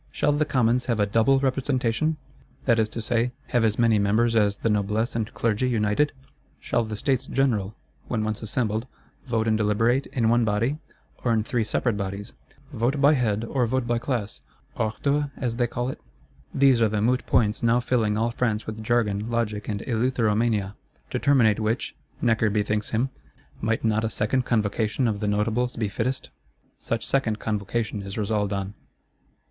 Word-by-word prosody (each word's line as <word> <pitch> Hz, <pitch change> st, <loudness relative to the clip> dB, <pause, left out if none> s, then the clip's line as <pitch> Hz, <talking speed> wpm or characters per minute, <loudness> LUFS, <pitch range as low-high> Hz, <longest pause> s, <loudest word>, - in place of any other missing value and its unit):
Shall 150 Hz, -, +1 dB
the 150 Hz, +1 st, +1 dB
Commons 125 Hz, -3 st, +1 dB
have 115 Hz, -3 st, 0 dB
a 105 Hz, -, +4 dB
"double 115 Hz, +6 st, +3 dB
representation," 135 Hz, +2 st, 0 dB, 0.5 s
that 115 Hz, -3 st, +3 dB
is 110 Hz, -1 st, +1 dB
to 115 Hz, -, -5 dB
say, 120 Hz, +2 st, 0 dB, 0.2 s
have 120 Hz, -3 st, +2 dB
as 110 Hz, -1 st, +2 dB
many 115 Hz, -3 st, +4 dB
members 110 Hz, +4 st, +2 dB
as 100 Hz, -2 st, +3 dB
the 115 Hz, -, -1 dB
Noblesse 105 Hz, +3 st, 0 dB
and 110 Hz, -2 st, -2 dB
Clergy 115 Hz, +3 st, +1 dB
united? 110 Hz, +5 st, +1 dB, 0.5 s
Shall 120 Hz, -, 0 dB
the 110 Hz, -1 st, -5 dB
States 130 Hz, +3 st, 0 dB
General, 110 Hz, -7 st, 0 dB, 0.3 s
when 110 Hz, -3 st, -1 dB
once 110 Hz, 0 st, -3 dB
assembled, 110 Hz, +1 st, -2 dB, 0.4 s
vote 115 Hz, -2 st, 0 dB
and 110 Hz, -, +3 dB
deliberate, 115 Hz, +5 st, +2 dB
in 115 Hz, -4 st, 0 dB
one 120 Hz, +1 st, +4 dB
body, 115 Hz, +7 st, 0 dB, 0.4 s
or 120 Hz, -, +2 dB
in 110 Hz, -2 st, +2 dB
three 120 Hz, 0 st, 0 dB
separate 110 Hz, +1 st, 0 dB
bodies; 100 Hz, +2 st, -5 dB, 0.4 s
"vote 125 Hz, +4 st, 0 dB
by 145 Hz, +2 st, +6 dB
head, 115 Hz, -6 st, 0 dB
or 125 Hz, 0 st, 0 dB
vote 130 Hz, +1 st, 0 dB
by 120 Hz, 0 st, 0 dB
class,"—ordre 110 Hz, -, -3 dB
as 120 Hz, -3 st, -2 dB
they 120 Hz, -1 st, +2 dB
call 120 Hz, +2 st, -3 dB
it? -, -, -7 dB, 0.5 s
These 135 Hz, -3 st, +4 dB
are 110 Hz, -, +4 dB
the 105 Hz, 0 st, -1 dB
moot 125 Hz, +4 st, +1 dB
points 110 Hz, -3 st, +2 dB
now 115 Hz, +1 st, +3 dB
filling 115 Hz, -4 st, +1 dB
all 115 Hz, +2 st, +1 dB
France 115 Hz, -3 st, -1 dB
with 110 Hz, 0 st, -6 dB
jargon, 110 Hz, -2 st, 0 dB
logic 110 Hz, -3 st, -2 dB
and 105 Hz, -1 st, -2 dB
eleutheromania. 115 Hz, -4 st, +1 dB, 0.4 s
To -, -, -1 dB
terminate 120 Hz, -7 st, +4 dB
which, 110 Hz, +3 st, -1 dB, 0.3 s
Necker 115 Hz, -2 st, +3 dB
bethinks 105 Hz, 0 st, 0 dB
him, 125 Hz, +4 st, 0 dB, 0.5 s
Might 115 Hz, +1 st, 0 dB
not 110 Hz, 0 st, +2 dB
a 110 Hz, -, 0 dB
second 125 Hz, +4 st, 0 dB
Convocation 110 Hz, +2 st, 0 dB
of 105 Hz, -2 st, -1 dB
the 105 Hz, -, -2 dB
Notables 110 Hz, +4 st, 0 dB
be 110 Hz, -3 st, -1 dB
fittest? 130 Hz, +6 st, -3 dB, 0.5 s
Such 115 Hz, -1 st, -3 dB
second 120 Hz, -6 st, +1 dB
Convocation 105 Hz, 0 st, -2 dB
is 100 Hz, +1 st, -7 dB
resolved 105 Hz, -1 st, 0 dB
on. 100 Hz, 0 st, -3 dB
115 Hz, 175 wpm, -25 LUFS, 105-125 Hz, 0.5 s, by